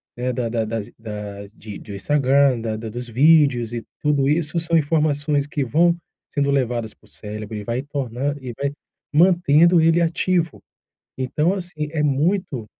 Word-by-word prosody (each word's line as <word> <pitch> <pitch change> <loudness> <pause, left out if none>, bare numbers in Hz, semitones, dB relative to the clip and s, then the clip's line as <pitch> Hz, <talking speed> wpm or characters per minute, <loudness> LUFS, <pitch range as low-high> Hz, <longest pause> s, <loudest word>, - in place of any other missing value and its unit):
né, 125 +1 -2
da 120 -1 -2
da 115 -1 -1
das 110 -1 -4
i - - -23
das 105 -2 -7
de 105 -2 -9
de 100 - -9
Instagram, 135 +1 +2
da 110 -1 -3
da 115 - -6
dos 120 +3 -6
vídeos 135 -3 +4
e 115 -1 -4 0.2
tudo 145 -2 +1
isso 160 +1 +1
são 165 0 +1
informações 145 -2 +1
que 145 -2 -2
vão 170 +6 +3 0.3
sendo 140 -1 0
levadas 120 -5 -1
pro - - -26
cérebro 105 0 -7
e 105 - -6
vai 120 +3 -2
tornar 140 -1 -3
e 125 -2 -6
vai 140 - 0 0.4
mantendo 170 0 +5
ele 165 +1 +4
ativo. 170 0 0 0.6
Então 150 +7 0
assim, 175 -5 -4
é 150 -2 0
muito 150 - 0
140 Hz, 170 wpm, -21 LUFS, 115-155 Hz, 0.6 s, mantendo